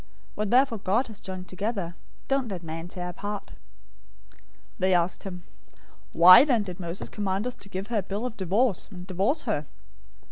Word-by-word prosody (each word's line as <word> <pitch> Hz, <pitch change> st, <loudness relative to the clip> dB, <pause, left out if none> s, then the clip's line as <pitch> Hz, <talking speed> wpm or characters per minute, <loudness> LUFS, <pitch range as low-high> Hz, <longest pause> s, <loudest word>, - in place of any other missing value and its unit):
What 210 Hz, -1 st, -2 dB
therefore 250 Hz, -2 st, +3 dB
God 205 Hz, +7 st, +1 dB
has 215 Hz, -, -9 dB
joined 185 Hz, -1 st, -7 dB
together, 195 Hz, -3 st, -3 dB, 0.3 s
don't 270 Hz, -2 st, +1 dB
let 185 Hz, -5 st, -5 dB
man 165 Hz, +1 st, -6 dB
tear 180 Hz, 0 st, -6 dB
apart." 205 Hz, +3 st, -6 dB, 0.8 s
019:007 -, -, -25 dB, 0.4 s
They 185 Hz, 0 st, +3 dB
asked 175 Hz, +1 st, 0 dB
him, 180 Hz, -2 st, -7 dB, 0.7 s
"Why 185 Hz, +7 st, +10 dB
then 245 Hz, -7 st, +2 dB
did 180 Hz, -2 st, -8 dB
Moses 175 Hz, +1 st, -5 dB
command 200 Hz, 0 st, -2 dB
us 250 Hz, -, -1 dB
to 200 Hz, -, -14 dB
give 190 Hz, 0 st, -4 dB
her 220 Hz, -, +3 dB
a -, -, -1 dB
bill 200 Hz, +5 st, -4 dB
of 245 Hz, -3 st, -4 dB
divorce, 200 Hz, +2 st, 0 dB
and 180 Hz, -3 st, -9 dB
divorce 195 Hz, -, 0 dB
her?" 155 Hz, -, -2 dB
195 Hz, 180 wpm, -27 LUFS, 180-220 Hz, 0.8 s, Why